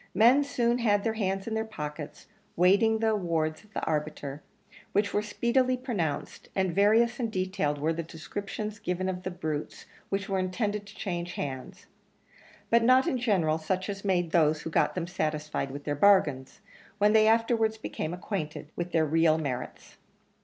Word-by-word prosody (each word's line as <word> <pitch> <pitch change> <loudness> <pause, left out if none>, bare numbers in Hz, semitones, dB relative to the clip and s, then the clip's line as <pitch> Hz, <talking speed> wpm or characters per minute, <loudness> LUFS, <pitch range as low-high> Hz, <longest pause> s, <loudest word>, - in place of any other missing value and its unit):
Men 240 +8 +6
soon 245 -3 0
had 205 -4 +2
their 225 - 0
hands 195 -3 -1
in 225 - -4
their 220 0 0
pockets, 150 -8 -7 0.3
waiting 200 +6 +4
the 220 0 +1
awards 165 -6 -1
of 215 - -23
the - - -2
arbiter, 150 -2 -3 0.5
which 205 0 +1
were 205 - +2
speedily 250 +4 +1
pronounced; 210 - -3
and 190 -3 +1
various 225 +5 +3
and 230 -3 -1
detailed 185 -6 -1
were 155 +3 0
the 165 - -3
descriptions 200 +6 -6
given 185 -2 -2
of 185 -1 -3
the 185 - -4
brutes 155 -4 -5 0.2
which 195 0 -2
were 195 -1 0
intended 205 +2 -2
to 205 - -13
change 175 -3 -4
hands; 145 +8 -6 0.9
but 235 0 +6
not 255 +3 +5
in 255 - 0
general 180 -10 +1
such 185 +5 -2
as 195 -1 -5
made 175 -4 +1
those 155 -2 +3
who 165 - -5
got - - +2
them 180 -2 -2
satisfied 155 -5 -2
with 140 +2 -7
their 145 - -1
bargains, 145 -7 +3 0.4
when 210 +1 +4
they 215 0 +6
afterwards 225 -1 +2
became 160 -6 -4
acquainted 165 -4 -5
with 175 0 -4
their 160 -1 +3
real 160 +1 +3
merits. 130 -5 -5
190 Hz, 175 wpm, -28 LUFS, 160-220 Hz, 0.9 s, Men